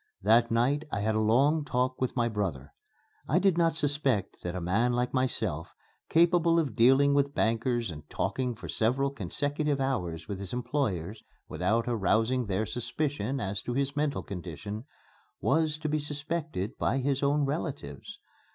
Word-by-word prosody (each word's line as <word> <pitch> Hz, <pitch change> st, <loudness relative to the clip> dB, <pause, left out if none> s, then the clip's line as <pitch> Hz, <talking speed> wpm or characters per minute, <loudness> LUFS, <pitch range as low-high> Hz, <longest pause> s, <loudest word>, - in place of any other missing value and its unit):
That 115 Hz, +3 st, +5 dB
night 125 Hz, +6 st, +2 dB
I 100 Hz, -, -1 dB
had 110 Hz, +1 st, +1 dB
a 110 Hz, -, +1 dB
long 135 Hz, +8 st, +3 dB
talk 130 Hz, -2 st, -1 dB
with 130 Hz, -, -1 dB
my 120 Hz, -2 st, +2 dB
brother. 95 Hz, -, -3 dB, 0.5 s
I 155 Hz, -, +2 dB
did 190 Hz, -1 st, +3 dB
not 165 Hz, -1 st, +2 dB
suspect 145 Hz, -, 0 dB
that 90 Hz, 0 st, -4 dB
a -, -, -2 dB
man 105 Hz, +8 st, +1 dB
like 125 Hz, 0 st, 0 dB
myself, 110 Hz, -, -1 dB, 0.3 s
capable 170 Hz, 0 st, +4 dB
of 145 Hz, -10 st, 0 dB
dealing 135 Hz, +4 st, +5 dB
with 140 Hz, 0 st, +1 dB
bankers 115 Hz, -1 st, +1 dB
and 75 Hz, -2 st, -10 dB
talking 125 Hz, -2 st, -1 dB
for 110 Hz, -, -9 dB
several 135 Hz, +5 st, +1 dB
consecutive 145 Hz, -, -1 dB
hours 90 Hz, -13 st, -2 dB
with 100 Hz, -2 st, -4 dB
his 100 Hz, -2 st, -6 dB
employers 110 Hz, -, -2 dB, 0.3 s
without 115 Hz, +2 st, 0 dB
arousing 115 Hz, +2 st, +1 dB
their 100 Hz, +2 st, 0 dB
suspicion 135 Hz, +2 st, -2 dB
as 100 Hz, -1 st, -2 dB
to 120 Hz, -, -4 dB
his 140 Hz, +1 st, 0 dB
mental 145 Hz, -2 st, 0 dB
condition, 100 Hz, -, -6 dB, 0.5 s
was 155 Hz, -1 st, +1 dB
to 155 Hz, 0 st, -4 dB
be 155 Hz, 0 st, 0 dB
suspected 150 Hz, -, -3 dB
by 120 Hz, -, +1 dB
his 135 Hz, 0 st, 0 dB
own 145 Hz, +1 st, +2 dB
relatives. 135 Hz, -, -4 dB
125 Hz, 160 wpm, -29 LUFS, 105-145 Hz, 0.5 s, That